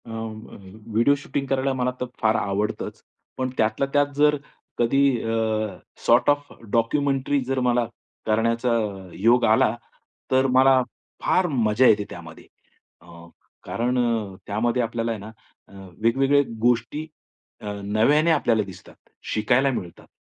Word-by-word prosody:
अं, - - -10 0.4
अ, - - -10 0.4
video 120 +6 +4
shooting 140 -1 -3
करायला 135 0 0
मला 125 -1 0
तर - - 0 0.2
फार 110 0 +3
आवडतंच, 100 +2 -2 0.4
पण 130 0 -1
त्यातल्या 110 +5 +1
त्यात 145 0 +2
जर 150 +1 +4 0.4
कधी 120 +4 +2 0.2
अ, 115 - -2 0.7
सॉर्ट 120 +3 +4
ऑफ 145 0 +1 0.2
डॉक्युमेंटरी 135 +4 +1
जर 135 +1 -1
मला 120 -1 +2 0.4
करण्याचा 115 +2 +1 0.5
योग 120 +4 +4
आला, 110 +1 +3 0.6
तर 130 +1 +3
मला 130 0 +6 0.4
फार 185 -1 +2
मजा 120 -4 +3
येते 105 -1 +4
त्यामध्ये - - -11 0.5
अ, 85 - -20 0.6
कारण 125 +2 -1
अ, 115 -5 -1
त्यामध्ये 120 +4 0
आपल्याला 115 0 -2
आहे 110 - -4
ना 105 +2 -9 0.4
अ, - - -20 0.3
वेगवेगळ्या 135 +5 +3 0.2
गोष्टी 120 +6 +1 0.6
अ, - - -10 0.2
नव्याने 130 +11 +3
आपल्याला 115 -8 +2
दिसतात, 95 -2 -13 0.4
शिकायला 120 +6 +2
मिळतात. 90 -9 -7
120 Hz, 135 wpm, -23 LUFS, 110-135 Hz, 0.7 s, मला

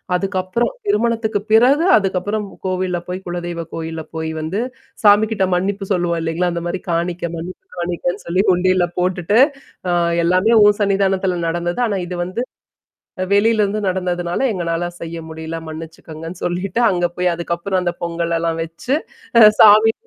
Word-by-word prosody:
அதுக்கப்புறம் 190 - -1
திருமணத்துக்கு 230 - +1
பிறகு 260 +8 +5
அதுக்கப்புறம் 200 +2 -1 0.2
கோவில்ல 185 -1 -1
போய் 180 +1 -4
குலதெய்வ 175 -1 -4
கோயில்ல 160 0 -5
போய் 160 0 -3
வந்து 175 +7 -2 0.4
சாமிகிட்ட 210 0 +4
மன்னிப்பு 195 +2 -1
சொல்லுவோம் 175 -2 0
இல்லைங்களா? 165 +2 0
அந்த 170 0 -3
மாரி 175 +2 -2
காணிக்க 170 +1 -1
மன்னிப்பு 180 - -8
காணிக்கன்னு 175 0 -2
சொல்லி 185 +3 +2
உண்டியில 185 0 +2
போட்டுட்டு, 180 +3 +1 0.5
அ - - +2 0.3
எல்லாமே 185 +6 +3
உன் 205 0 +5
சன்னிதானத்துல 195 -2 +1
நடந்தது. 175 +5 -2
ஆனா, 200 -2 -1
இது 180 0 -5
வந்து, 195 +7 -4 0.9
வெளியிலருந்து 210 0 +3
நடந்ததுனால 180 0 -2
எங்களனால 170 -2 -2 0.2
செய்ய 170 0 -6
முடியல 160 +1 -6
மன்னிச்சுக்கங்கன்னு 160 +1 -8
சொல்லிட்டு 180 +5 -2
அங்க 175 -1 +1
போய் 180 -1 +1
அதுக்கப்புறம் 170 +3 -2
அந்த 175 - 0
பொங்கலெல்லாம் 170 -1 -1
வச்சு, 170 - -3 0.4
அ - - +9 0.2
சாமி 215 +1 +8
180 Hz, 135 wpm, -19 LUFS, 170-200 Hz, 0.9 s, அ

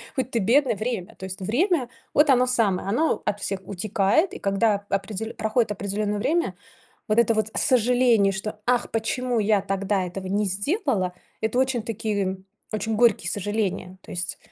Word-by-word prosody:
хоть 260 -2 -2
ты 230 - +1
бедный- 245 +5 +3
время. 215 -3 -4
То 190 - -8
есть 190 0 -7
время- 260 - +1 0.2
вот 295 +1 +4
оно 250 -2 +5
самое. 220 -7 +1
Оно 270 +11 +1
от 205 0 -1
всех 195 -1 -2
утекает. 205 - +1
И - - -7
когда 200 +1 +1
определё 210 +2 -3
проходит 220 +1 0
определённое 205 +1 -2
время, 270 - 0 0.5
вот 215 0 +1
это 235 -1 +4
вот 215 0 0
сожаление, 245 -4 +3
что: 210 +2 -5
"Ах, 245 0 +1
почему 240 +2 -1
я 210 -1 +3
тогда 195 0 -1
этого 185 +1 -6
не 200 +3 0
сделала?"- 205 - 0 0.3
это 220 +3 0
очень 260 -3 +1
такие, 215 -2 -2
м, 190 0 -4 0.3
очень 215 +1 -1
горькие 235 -2 +3
сожаления. 200 -2 -2
То - - -14
есть 175 -1 -4
215 Hz, 170 wpm, -24 LUFS, 195-245 Hz, 0.5 s, оно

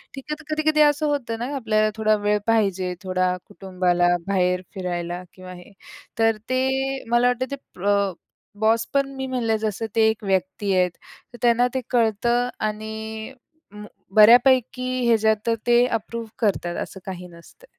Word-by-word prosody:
ठीक 270 - -8
आहे. 300 - -1
तर - - -13
कधी-कधी 310 0 +2
असं 295 +1 +3
होतं 240 -6 -2
ना 250 +4 -4
आपल्याला 215 -4 +1
थोडा 215 0 +3
वेळ 210 0 +2
पाहिजे, 195 -5 +1
थोडा 185 -1 0
कुटुंबाला 185 -3 0 0.2
बाहेर 180 -2 +1
फिरायला 175 -1 -4
किंवा 185 -1 -11
हे. 180 +2 -13 0.5
तर 225 -1 +3
ते 265 +1 0
मला 240 +1 +4
वाटतं 250 +1 -1
ते - - -1 0.2
प्र 200 +1 +1 0.5
बॉस 225 +1 +2
पण 275 -1 +1
मी 265 0 -4
म्हणलं 235 -4 0
जसं 220 +1 -2
ते 220 -1 +5
एक 220 0 -3
व्यक्ती 190 +1 -1
आहेत 180 -1 +2 0.4
तर - - -10
त्यांना 240 0 +4
ते 260 - -1
कळतं 240 +1 +1 0.2
आणि 220 +2 -6 0.4
म 210 0 -10 0.3
बऱ्यापैकी 250 +3 +5 0.2
ह्याच्यात 220 -1 +3
तर 230 - +3
ते 240 +1 +5
अप्रूव्ह 230 0 -4
करतात. 180 -5 0
असं 190 - -11
काही 180 -2 -7
नसतं. 170 - -17
220 Hz, 160 wpm, -23 LUFS, 195-245 Hz, 0.5 s, ते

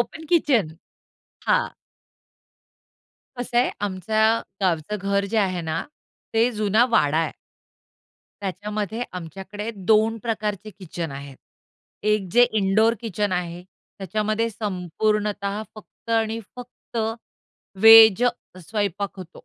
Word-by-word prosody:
Open 320 - -4
kitchen. 265 - +3 0.8
हां. - - +2 1.7
कसं 245 0 -4
आहे 250 - +3
आमचं 220 +4 +1 0.2
गावचं 175 +2 0
घर 200 0 +2
जे - - +4
आहे 185 -4 0
ना, 160 -1 -2 0.5
ते 230 +2 +3
जुना 215 +2 +3
वाडा 150 -8 +3
आहे. 165 - 0 1.1
त्याच्यामध्ये 210 +3 -3
आमच्याकडे 195 +5 -6
2 215 +3 +2
प्रकारचे 215 -3 -3
किचन 170 -3 -5
आहेत. 140 -1 -9 0.7
1 210 -2 +1
जे 245 - +6 0.2
इनडोअर 215 +3 +3
किचन 210 -3 -2
आहे. 175 -1 -3 0.4
त्याच्यामध्ये 215 +4 -1
संपूर्णतः 205 +1 -2
फक्त 220 +1 -13
आणि 225 0 +1 0.2
फक्त 245 -1 -11 0.8
व्हेज 225 0 +9 0.5
स्वयंपाक 200 -2 -2
होतो. 185 -3 -9
210 Hz, 105 wpm, -23 LUFS, 185-225 Hz, 1.7 s, व्हेज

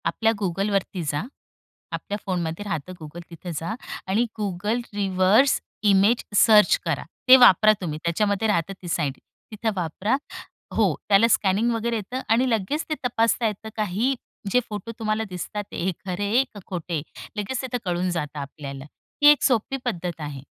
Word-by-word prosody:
आपल्या 220 +7 +2
Googleवरती 195 0 -1
जा. 145 +4 -2 0.7
आपल्या 205 - -4
फोनमध्ये 175 -1 -2
राहतं 170 -2 -4
Google 165 +3 -10
तिथे 175 +1 -8
जा. 165 +8 -3 0.3
आणि 210 +6 +2 0.2
Google 205 +4 -1
रिव्हर्स 200 +6 +3 0.3
इमेज 200 +5 +4
सर्च 215 - +6
करा. - - -1 0.2
ते 255 - +11
वापरा 215 -3 +7
तुम्ही 155 -4 -4
त्याच्यामध्ये 200 +5 +1
राहतं 195 -2 0
ती 180 - -8
साईट. 150 -5 -1 0.3
तिथं 220 +1 -2
वापरा 185 +7 -1 0.6
हो, - - +3
त्याला 205 +3 +6
स्कॅनिंग 215 +1 +2
वगैरे 230 +1 -1
येतं 230 +5 -4
आणि 250 +3 +2
लगेच 225 +7 0
ते 310 - 0
तपासता 230 0 +2
येतं 215 +1 -5
काहीही 215 +6 0 0.4
जे 250 - +5
फोटो 210 +1 -5
तुम्हाला 215 0 0
दिसतात 185 +3 -5
हे 185 +2 -1
खरे 185 +2 -2
आहे 240 +6 +4
का 205 - -9
खोटे 175 -2 -5
आहे. 150 -3 -1 0.4
लगेच 220 +5 -2
तिथं 255 -2 -3
कळून 180 0 0
जातं 150 -4 -3
आपल्याला 140 -1 -7 0.4
ही 290 - +7
एक 295 - +2
सोपी 260 0 +2
पद्धत 175 -7 -3
आहे. 145 -3 -6
200 Hz, 160 wpm, -24 LUFS, 175-225 Hz, 0.7 s, ते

